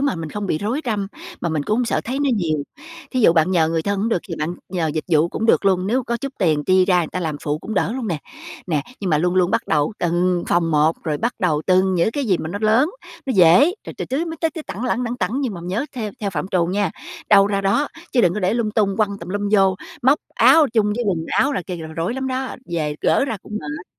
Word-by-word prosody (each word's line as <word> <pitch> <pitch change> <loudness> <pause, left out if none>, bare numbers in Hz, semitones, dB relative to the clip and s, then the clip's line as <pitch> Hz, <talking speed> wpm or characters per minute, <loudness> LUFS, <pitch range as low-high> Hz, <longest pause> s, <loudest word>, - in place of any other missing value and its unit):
mà 280 -1 +1
mình 160 -2 -6
không 205 -1 -4
bị 155 - 0
rối 235 +9 -2
răm, 210 -4 -1 0.3
mà 170 - -1
mình 155 -2 -1
cũng 210 +8 0
hông 250 - +1
sợ - - 0
thấy 260 +4 -3
nó 285 -2 +1
nhiều, 160 -5 0 0.5
thí 255 - 0
dụ 170 - +6
bạn 165 +1 +3
nhờ 165 -4 +3
người 165 -1 0
thân 200 +1 -1
hổng 220 - 0
được 225 - +1
thì - - -3
bạn 160 +4 -2 0.2
nhờ 170 -3 0
dịch 155 - -2
vụ 160 0 +3
cũng 225 - -3
được - - +3
luôn, 190 -1 +2
nếu 255 +5 +1
có 235 - -1
chút 275 +2 -5
tiền 155 -5 +1
chi 185 0 +4
ra 180 -2 +3
người 165 - -3
ta 185 - -4
làm 155 -3 -2
phụ 150 0 -1
cũng 220 - -6
đỡ - - +1
luôn 250 -3 -4
nè. 165 -4 -1 0.5
Nè, 155 -6 0 0.2
nhưng 190 -4 -2
mà 150 - +3
luôn 180 +2 +1
luôn 185 -1 +3
bắt - - 0
đầu 150 +6 +1
từng 175 +1 +1
phòng 165 -1 +2
một, 155 +2 +3
rồi 155 -2 -1
bắt 240 +1 -1
đầu 155 -7 +1
từng 185 0 +3
những 175 +5 +2
cái 285 +2 -2
gì 190 -6 +1
mà 160 - -4
nó 200 +4 -4
lớn, 230 +9 +3 0.4
nó 265 - 0
dễ, 195 - +6
rồi - - -7
từ - - -2
tứ 285 +6 -2
mới 325 -1 -6
tới 325 - +1 0.2
tẳng 230 +6 -5
lẳng, 250 0 0
lẳng 240 +1 -3
tẳng 250 +2 -1
nhưng 250 -8 -2
mà 170 - -7
nhớ 200 +11 -2
theo 220 -4 -4
theo 200 -2 -2
phạm 170 +2 -3
trù 175 -3 +1
nha, 195 0 0 0.4
đâu 200 -1 +7
ra 200 -1 0
đó, 200 +9 +1 0.2
chứ 250 - +4
đừng 175 -3 +3
có 210 - -2
để 185 +3 +1
lung 230 -3 0
tung 205 -2 +1
quăng 200 -2 0
tùm 170 - -9
lum 205 +2 -2
vô, 195 -2 +4 0.3
móc 270 +5 +4 0.2
áo 320 -2 +6
chung 220 -3 +3
với 240 - -1
quần 180 -5 +1
áo 285 - +1
là 220 - -2
kia 180 +1 -6
là 160 -1 -7
rối 165 +7 -3
lắm 265 0 -3
đó, 260 0 -3
về 150 -3 -2
gỡ - - +3
ra 230 -6 -3
cũng - - -12
mệt. 150 +4 -6
195 Hz, 285 wpm, -21 LUFS, 170-230 Hz, 0.5 s, đâu